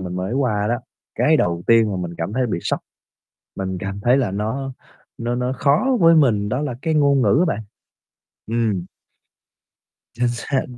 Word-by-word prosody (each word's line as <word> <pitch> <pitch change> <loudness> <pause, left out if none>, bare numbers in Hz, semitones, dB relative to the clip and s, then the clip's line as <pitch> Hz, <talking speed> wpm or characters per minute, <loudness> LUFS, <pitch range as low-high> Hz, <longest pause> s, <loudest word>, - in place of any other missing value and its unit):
mình 90 -1 -5
mới 95 +5 -3
qua 110 -6 0
đó, 120 - +2 0.4
cái 155 +1 +3
đầu 85 - 0
tiên 115 -2 +5
mà - - -2
mình 85 -1 -5
cảm 85 +5 -3
thấy 125 +1 0
bị 95 - -2
sốc. - - -1 0.8
Mình 95 -1 -3
cảm 100 +1 -5
thấy 120 +5 +3
là 120 -8 +1
nó 110 +7 -3 0.5
nó 120 +1 -2
nó 125 +1 -1
khó 155 - +2
với 165 -1 +7
mình 115 -10 +3
đó 125 +5 -1
là 135 -5 -3
cái 160 -1 0
ngôn 140 -2 +3
ngữ 105 0 +3
á - - +4
bạn. - - -6 0.9
Ừm. 110 -5 0 1.3
Chính 120 +1 +1
xác. 125 +3 -2
120 Hz, 185 wpm, -21 LUFS, 100-135 Hz, 1.3 s, với